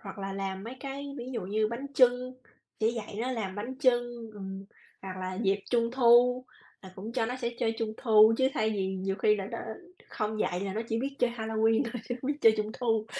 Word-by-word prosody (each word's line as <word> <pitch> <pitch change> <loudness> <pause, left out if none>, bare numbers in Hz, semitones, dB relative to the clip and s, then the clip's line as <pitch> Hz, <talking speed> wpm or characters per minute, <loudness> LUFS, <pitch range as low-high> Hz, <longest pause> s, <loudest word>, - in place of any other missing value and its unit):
hoặc 195 0 -9
là 195 0 -4
làm 195 0 -4
mấy 240 +3 -6
cái 280 0 -6
ví 245 +1 -6
dụ 230 - -2
như 215 +3 +1
bánh 235 +5 -5
chưng, 250 0 +4 0.4
chỉ 220 +1 +3
dạy 220 -3 -6
nó 255 - -1
làm 215 -7 -3
bánh 230 +6 -5
chưng, 240 -3 +1
ừm, 195 -1 -7 0.4
hoặc 185 -1 -6
là 185 0 -3
dịp 200 -1 +1
Trung 235 -1 +2
thu 250 0 +5 0.4
là 190 -1 -11
cũng 210 +5 -7
cho 235 -2 0
nó 250 +2 -3
sẽ 240 -2 -2
chơi 225 0 +1
Trung 220 -1 -1
thu 220 -2 +6
chứ 260 - +4
thay 220 0 +1
vì 190 -2 -1
nhiều 190 +1 -2
khi 210 0 +3
là 195 -2 -4
nó 230 - -4 0.5
không 215 0 -3
dạy 180 -2 0
là 195 -1 -3
nó 220 - -1
chỉ 225 - 0
biết 275 +2 -3
chơi 245 - +2
Halloween 225 0 +1
thôi, 235 -1 -5
chứ 245 - -1
không 265 - -2
biết 295 - -10
chơi 225 -1 +7
Trung 215 0 -1
thu. 225 -3 +1
225 Hz, 235 wpm, -29 LUFS, 200-245 Hz, 0.5 s, chơi